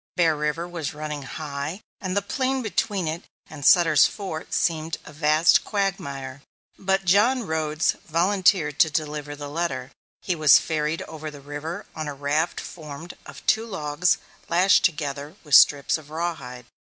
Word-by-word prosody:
Bear 165 -3 +3
River 150 +3 -2
was 165 -5 -5
running 150 -1 -5
high, 140 +4 -5 0.2
and 185 0 -3
the 200 - +1
plain 260 +5 -1
between 205 -4 -1
it 160 +2 -4 0.3
and 150 -2 -9
Sutter's 160 -2 +6
Fort 185 -6 -6
seemed 160 -1 0
a 150 - -11
vast 155 +2 +4
quagmire, 140 -10 -3 0.4
but 195 0 0
John 220 +7 +3
Rhodes 155 -1 0
volunteered 170 -3 +2
to 160 - +6
deliver 150 -1 -3
the 145 0 -7
letter. 145 -5 -3 0.3
He 185 - 0
was 155 -3 +7
ferried 155 0 -1
over 155 -1 -7
the 145 -1 -11
river 145 +4 -6
on 155 -1 -4
a 145 - -5
raft 145 +4 -1
formed 155 +1 -9
of - - -12
two 225 +1 +2
logs 160 -3 0 0.3
lashed 180 +3 +4
together 150 -2 -1
with 150 -3 -8
strips 145 +3 +6
of 150 -1 -16
rawhide. 150 -7 -5
155 Hz, 155 wpm, -24 LUFS, 145-175 Hz, 0.4 s, was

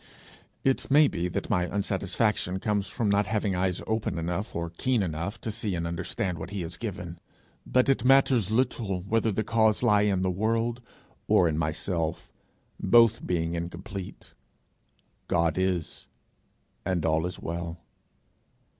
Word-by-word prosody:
It 135 -1 +1
may 145 +2 +6
be 90 -8 -2
that 90 - -3
my 90 0 +2
unsatisfaction 100 -1 0
comes 105 -1 0
from 115 -3 -2
not 100 0 +2
having 105 -2 0
eyes 90 -1 -1
open 110 -5 -1
enough, 90 +6 -3
or 85 0 -3
keen 120 +5 0
enough, 85 +5 -4
to 110 - -3
see 105 -3 -2
and 85 -1 -2
understand 85 +1 -3
what - - -6
he 100 -1 -4
has 85 +1 -5
given; 90 -6 -6 0.5
but 125 +1 +3
it 135 -4 +2
matters 130 -5 +4
little 110 -5 0
whether 110 +3 +1
the 110 +2 -1
cause 110 0 +2
lie 105 -4 +5
in 100 -3 +1
the 95 - +1
world 115 +5 0 0.5
or 85 - +5
in 80 - 0
myself, 80 +1 -2 0.5
both 115 -2 +4
being 85 -2 0
incomplete: 90 +3 -6 0.9
God 85 -2 +2
is, 90 -3 -2 0.8
and 90 -3 -1
all 80 +1 +2
is 90 - -7
well. 85 0 -4
95 Hz, 150 wpm, -27 LUFS, 85-110 Hz, 0.9 s, may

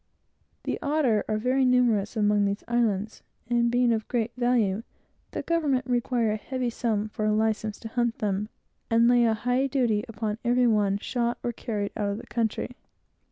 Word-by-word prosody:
The - - -2
otter 280 -8 +2
are 215 - +1
very 255 +4 +1
numerous 245 -4 +2
among 205 -1 +3
these 200 +1 -2
islands, 220 -3 0 0.3
and 235 0 +2
being 245 0 +3
of 220 -1 -2
great 235 -2 -1
value, 240 -5 +1 0.5
the - - -5
government 290 -7 +1
require 240 -2 +1
a 215 - -1
heavy 250 +2 -3
sum 215 -3 -1
for 215 - -4
a 215 - +2
license 220 -1 0
to 225 - -6
hunt 240 0 -1
them, 205 0 -1 0.4
and 230 +1 +4
lay 240 -1 +5
a 225 -1 +2
high 250 +4 0
duty 240 -6 +1
upon 215 -1 -4
every 245 +1 +3
one 205 -4 +2
shot 235 +2 -2
or 240 - -1
carried 210 -3 -3
out 205 -1 -1
of 200 - -2
the 235 - -9
country. 235 +1 -2
230 Hz, 180 wpm, -26 LUFS, 215-245 Hz, 0.5 s, lay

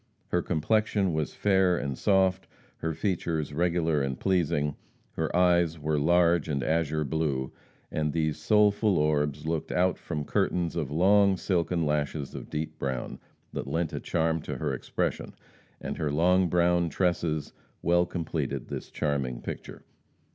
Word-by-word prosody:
Her 90 - +1
complexion 95 +3 +1
was 80 -1 -2
fair 95 -3 +3
and 70 -2 -3
soft, 95 -1 +2 0.3
her 80 - -2
features 80 -7 -2
regular 85 -2 +1
and 65 -1 -2
pleasing, 85 -6 +1 0.4
her 80 +1 -2
eyes 85 -2 +3
were 75 0 0
large 85 +1 +3
and 70 -4 -1
azure 80 +1 0
blue, 70 -3 -1 0.4
and 75 -1 0
these 80 -1 -1
soulful 105 +2 +3
orbs 75 -1 0
looked 80 -1 -2
out 90 +2 +1
from 75 -3 -4
curtains 85 +3 0
of 80 -6 -2
long 95 +5 +4
silken 85 -2 0
lashes 75 -1 -1
of - - -8
deep 75 +1 -4
brown, 65 -2 -3 0.3
that - - -4
lent 85 -1 -1
a - - -2
charm 80 -1 0
to - - -5
their - - -2
expression, - - -3 0.4
and - - -5
her 75 - 0
long 90 +4 +3
brown 85 0 +2
tresses 85 -4 -1 0.3
well 85 +1 +3
completed 85 -3 -3
this - - -6
charming 70 -5 -2
picture. - - -7
80 Hz, 145 wpm, -28 LUFS, 75-90 Hz, 0.4 s, long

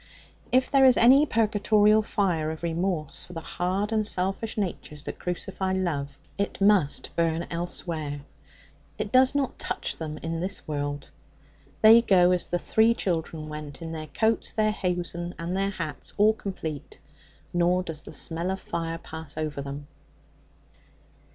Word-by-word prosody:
If 255 +1 +3
there 275 -1 +5
is 255 -1 +6
any 270 +6 +6
purgatorial 215 -1 +3
fire 180 -7 0
of 160 +1 -6
remorse 170 -2 -2
for 180 - -12
the 165 - -4
hard 185 +6 -2
and 215 -1 +1
selfish 195 +4 -2
natures 170 -7 -4
that - - -7
crucify 190 +1 -3
love, 155 -7 -2 0.2
it 200 - -2
must 195 -7 +2
burn 165 0 +1
elsewhere. 165 -4 -4 0.8
It - - -3
does 260 +1 +5
not 275 -2 -1
touch - - -3
them 155 -2 -5
in 165 0 -2
this 185 +3 -3
world. 145 -1 -3 0.7
They 225 +2 +9
go 185 -5 +5
as 180 -1 +1
the 175 - 0
three 220 +5 +3
children 160 -5 -2
went, 150 -2 -7
in 165 -1 -6
their 155 -1 -5
coats, 225 +5 +1
their 215 -1 +2
hosen, 175 -2 -3
and 170 +2 -3
their 195 +1 +1
hats 160 -7 -6
all 215 +1 +5
complete, 165 -9 -6 0.6
nor 175 +1 +2
does 160 -3 -6
the - - -11
smell 165 +4 -1
of 190 0 -2
fire 165 -2 -3
pass 160 -2 -9
over 155 -2 -3
them. 140 +1 -6
175 Hz, 155 wpm, -26 LUFS, 160-205 Hz, 0.8 s, They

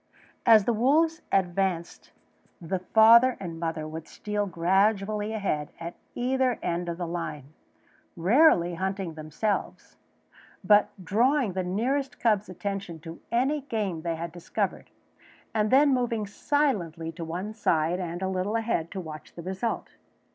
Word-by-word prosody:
As 220 -3 +7
the 235 - +2
wolves 315 +9 +2
advanced 180 -2 -1 0.5
the 180 +2 -3
father 230 +6 +6
and 170 -4 -6
mother 165 -2 -3
would 160 +1 -7
steal 210 -1 -3
gradually 195 +4 +1
ahead 195 -9 -2
at 170 +1 -6 0.2
either 255 0 +1
end 175 +1 -2
of 170 - -4
the 175 - -3
line, 155 -4 -5 0.6
rarely 180 - +4
hunting 190 -1 -3
themselves, 155 +7 -3 0.7
but 205 +2 +5 0.2
drawing 240 - +2
the 185 - -1
nearest 245 +10 -1
cub's 210 -4 +1
attention 190 -1 -5
to 165 0 -9
any 270 +5 +1
game 210 - -3
they 165 0 -2
had 170 +1 -5
discovered, 175 0 -3 0.6
and 215 -1 +1
then 275 +3 +5
moving 235 -4 0
silently 200 - -1
to 165 +1 -7
one 180 +6 -4
side 170 -5 +1
and 175 0 -4
a - - 0
little 190 +3 -1
ahead 220 -8 -1
to 195 - -6
watch 155 -4 -9
the 170 - -8
result. 190 +6 -3
190 Hz, 140 wpm, -27 LUFS, 170-225 Hz, 0.7 s, As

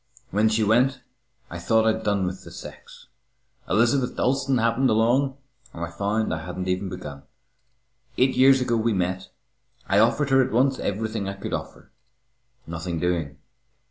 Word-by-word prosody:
When 105 +3 +3
she 110 0 +1
went, 125 +5 +2 0.5
I 85 - -6
thought 110 +5 +2
I'd 110 0 +1
done 100 -2 +1
with 90 +1 -5
the - - -11
sex. - - -12 0.6
Elizabeth 120 +6 +2
Dalstan 135 0 +1
happened 115 +3 +2
along, 125 +5 +2 0.4
and 85 0 -3
I 85 - -10
found 100 +4 -1
I 80 -1 -4
hadn't 90 +2 -5
even 95 +1 -1
begun. 75 -7 -8 1.0
Eight 130 +1 +3
years 135 +1 +5
ago 120 -2 +1
we 115 0 +1
met. 95 0 -2 0.6
I 100 +1 +3
offered 135 +6 +2
her 135 0 +5
at 130 - -4
once 130 +3 +2
everything 105 0 -3
I - - -4
could 100 - -6
offer. - - -6 0.7
Nothing 85 0 -4
doing. 85 -5 -2
110 Hz, 160 wpm, -24 LUFS, 90-125 Hz, 1.0 s, years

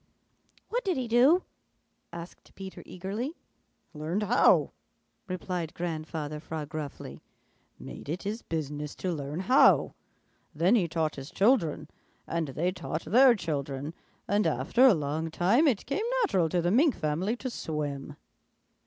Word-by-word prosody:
"What - - -1
did 375 -6 0
he 255 -2 -2
do?" 260 +10 +5 0.7
asked 170 +1 -10
Peter 190 0 -8
eagerly. 210 - -4 0.6
"Learned 160 +7 -2
how," 240 +5 +4 0.6
replied 180 -3 -4
Grandfather 155 -3 -4
Frog 155 -1 -6
gruffly. 155 -2 -7 0.6
"Made - - -10
it 170 +4 -3
his 210 +4 -3
business 150 -2 -4
to 185 - -3
learn 150 +2 -4
how. 255 +8 +5 0.6
Then 170 +7 +3
he 200 -8 +3
taught 160 -2 -1
his 135 +2 -7
children, 180 - +2 0.4
and 165 -2 -2
they 160 +7 -1
taught 165 -3 -5
their 250 +2 +6
children, 145 -5 -4 0.3
and 205 +2 +2
after 255 +2 +4
a 235 - +6
long 155 +2 -2
time 205 - +3
it 240 -8 +1
came 400 - -2 0.2
natural 185 - +2
to 175 +1 0
the 175 - +2
Mink 275 - +4
family 175 +7 -1
to 255 +1 -5
swim." 145 -6 -4
175 Hz, 140 wpm, -28 LUFS, 155-225 Hz, 0.7 s, their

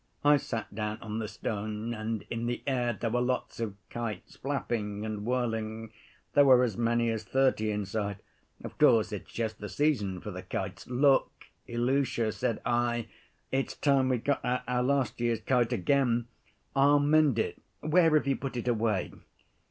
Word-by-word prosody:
I 145 0 +7
sat 115 -6 -5
down 105 0 -3
on 110 0 -4
the 110 - -3
stone. 105 +1 -4
And 110 -1 -3
in 115 0 -2
the 120 - -3
air 125 -3 +1
there 115 0 -3
were 125 +1 +1
lots 125 -1 -2
of 110 -4 -3 0.2
kites 115 -5 -5
flapping 110 -7 -3
and 105 -1 -4
whirling. 115 -3 -2 0.4
There 145 - +7
were 130 -2 +7
as 115 -5 0
many 115 +1 +1
as 110 -1 -3
thirty 130 0 +2
in 105 -1 -1
sight. 100 0 -3 0.5
Of - - -9
course, 110 -2 +5
it's 105 - -6
just 110 -2 -3
the 105 - -6
season 105 -12 0
for 105 - -7
the 90 0 -6
kites. 95 +1 -5
'Look, 135 +2 +2 0.2
Ilusha,' 120 -1 +1
said 110 +1 -2
I, 120 -1 0 0.4
'it's 135 0 -1
time 135 -2 +2
we 130 - +2
got 140 +5 -1
out 125 +1 0
our 125 0 +1
last 135 -1 0
year's 120 -2 +1
kite 120 0 +2
again. 120 +2 +2 0.5
I'll 140 +2 +5
mend 145 -3 +4
it, 110 - -2 0.2
where 160 +1 +4
have 150 - +3
you 135 -1 +1
put 135 -2 -5
it 120 - -4
away? 110 -5 +1
120 Hz, 175 wpm, -29 LUFS, 110-130 Hz, 0.5 s, I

